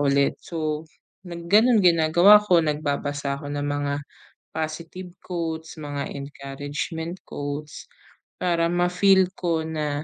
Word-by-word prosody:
ulit. 140 -1 +2
So 155 -1 -4 0.4
nag 170 -1 -7
gano'n 220 +1 +6
ginagawa 175 +4 +6
ko. 180 -5 +3
Nagbabasa 145 -2 -2
ako 145 -1 -6
ng 145 0 -2
mga 145 0 -1 0.6
positive 165 +3 -5
quotes, 165 -2 -5
mga 145 -1 -4
encouragement 145 +4 -5
quotes 145 +1 -6 0.5
para 170 -2 +1
mafeel 180 +2 +3
ko 165 -3 0
na 150 -2 -2
160 Hz, 115 wpm, -24 LUFS, 145-175 Hz, 0.6 s, gano'n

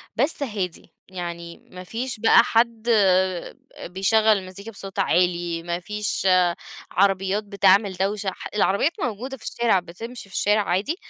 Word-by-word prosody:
بس 280 +4 +1
هادي، 190 -9 -5 0.2
يعني 170 -2 -7
ما 180 0 -9
فيش 235 +5 -5
بقى 230 +1 +6
حد 230 0 +1 1.0
بيشغّل 195 +5 +1
المزيكا 195 +3 -8
بصوت 195 -2 -8
عالي، 175 -1 +1
ما 170 0 -3
فيش 210 +1 -2 0.6
عربيات 195 +2 +1
بتعمل 200 0 +3
دوشة 195 +2 -1
ح - - -8
العربيات 205 - +2
موجودة 250 +3 -4
في 225 - -17
الشارع 230 -5 +1
بتمشي 195 +6 -10
في - - -11
الشارع 210 +1 +2
عادي 200 - 0
200 Hz, 135 wpm, -23 LUFS, 180-225 Hz, 1.0 s, بقى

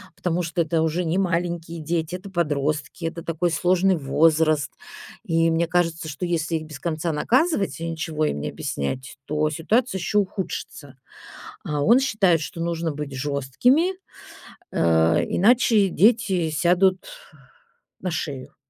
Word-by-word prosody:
потому 180 0 -1
что 170 +1 -1
это 160 0 0
уже 160 +3 0
не 170 +3 0
маленькие 170 -2 -2
дети, 160 +2 -2
это 190 +2 -9
подростки, 155 -1 -2
это 165 +1 -4
такой 170 +1 -1
сложный 185 +3 +2
возраст. 155 +1 +2 0.5
И 165 0 +2
мне 165 +1 +1
кажется, 165 -1 0
что 150 +4 -4
если 165 -1 -1
их 155 - -3
без 155 -2 -10
конца 165 0 -2
наказывать 250 - +1
и 165 - -4
ничего 155 -1 -2
им 75 - -1
не - - -3
объяснять, 130 - -4
то 150 +1 0
ситуация 190 - 0
еще 210 +4 -1
ухудшится. 180 -7 -5 0.7
А 150 -1 -2
он 235 - +6
считает, 195 - +2
что 165 +2 -6
нужно 170 -1 -2
быть 145 -1 -6
жёсткими, 145 - +1 0.8
э, 80 0 +3
иначе 220 -1 +4
дети 195 -4 +2
сядут 180 +5 +3 1.0
на 185 - -3
шею. 145 -5 -5
165 Hz, 140 wpm, -23 LUFS, 155-180 Hz, 1.0 s, он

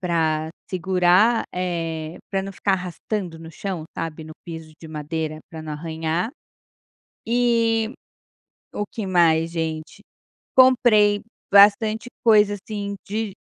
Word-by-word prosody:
pra 160 -3 0 0.2
segurar, 185 +5 +3
eh, 165 -3 -3
pra 195 -1 0
não 195 - -6
ficar 195 +1 0
arrastando 180 0 -4
no 165 0 -10
chão, 175 -1 -5
sabe, 160 -1 -4
no 155 - -9
piso 160 -2 -8
de 160 - -10
madeira, 155 0 -4
pra 160 -1 -8
não 155 - -6
arranhar. 160 +5 -2 1.0
E 230 -2 +2 0.8
o 205 - -2
que 210 -1 -6
mais, 165 -3 +3
gente? 160 -2 -4 0.6
Comprei 230 -5 +5 0.3
bastante 215 +4 +5 0.2
coisa, 210 -3 +5
assim, 200 0 -5
de 215 0 -3
180 Hz, 120 wpm, -23 LUFS, 160-210 Hz, 1.0 s, Comprei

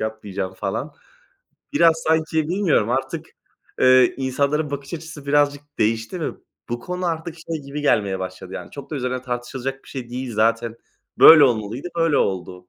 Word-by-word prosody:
yapmayacağım" 100 -3 -4
falan. 125 +10 -4 0.8
Biraz, 165 - +5
sanki, 160 -1 +1
bilmiyorum 170 - +2
artık, 130 +2 -2 0.5
eee, 130 -1 +6
insanların 140 +3 0
bakış 140 +2 -5
açısı 155 -3 -9
birazcık 145 0 +2 0.2
değişti 115 - 0
ve - - -1 0.4
bu 120 0 -3
konu 180 +3 -4
artık 165 0 -3
şey 160 -2 -6
gibi 140 +2 -5
gelmeye 100 -8 +2
başladı 95 0 -7
yani. - - -7
Çok 140 +1 -10
da 150 - -3
üzerine 125 -1 -2
tartışılacak 130 +2 -5
bir - - -17
şey 125 -3 -6
değil 125 -2 -5
zaten. 115 +1 +1 0.4
Böyle 155 -3 +10
olmalıydı, 120 +5 -1
böyle 165 -3 +2
oldu. 90 -1 -2
130 Hz, 155 wpm, -22 LUFS, 115-155 Hz, 0.8 s, Böyle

